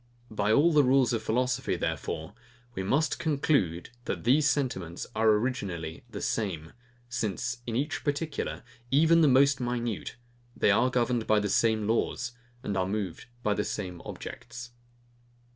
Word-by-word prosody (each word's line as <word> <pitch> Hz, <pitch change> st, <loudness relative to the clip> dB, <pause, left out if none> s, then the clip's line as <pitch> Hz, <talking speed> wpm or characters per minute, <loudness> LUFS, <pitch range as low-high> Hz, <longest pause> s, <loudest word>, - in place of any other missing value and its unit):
By 105 Hz, 0 st, +1 dB
all 155 Hz, +8 st, +5 dB
the 150 Hz, -1 st, +6 dB
rules 130 Hz, -2 st, +4 dB
of 115 Hz, -, 0 dB
philosophy, 125 Hz, +4 st, 0 dB
therefore, 80 Hz, +4 st, -3 dB, 0.4 s
we 95 Hz, -, -3 dB
must 140 Hz, +12 st, +1 dB
conclude, 140 Hz, -, 0 dB
that -, -, -3 dB
these 145 Hz, +5 st, +4 dB
sentiments 95 Hz, -, -2 dB
are 110 Hz, 0 st, +3 dB
originally 100 Hz, -8 st, -1 dB
the -, -, -6 dB
same; 85 Hz, -8 st, -2 dB, 0.3 s
since, 120 Hz, 0 st, -2 dB
in 115 Hz, -, -2 dB
each 145 Hz, +6 st, -1 dB
particular, 150 Hz, +1 st, -2 dB, 0.3 s
even 160 Hz, +5 st, +5 dB
the 155 Hz, -, +6 dB
most 140 Hz, +1 st, +5 dB
minute, 120 Hz, -3 st, -3 dB, 0.4 s
they -, -, +4 dB
are 120 Hz, +5 st, +3 dB
governed 120 Hz, -2 st, 0 dB
by 110 Hz, -1 st, +4 dB
the 105 Hz, 0 st, -1 dB
same 110 Hz, 0 st, +2 dB
laws, 120 Hz, +2 st, 0 dB, 0.3 s
and 100 Hz, -, -2 dB
are 95 Hz, -1 st, +1 dB
moved 100 Hz, -1 st, -4 dB, 0.2 s
by 105 Hz, -, +2 dB
the 105 Hz, -, -1 dB
same 90 Hz, -5 st, -5 dB
objects. 120 Hz, 0 st, -8 dB
120 Hz, 150 wpm, -28 LUFS, 105-135 Hz, 0.4 s, the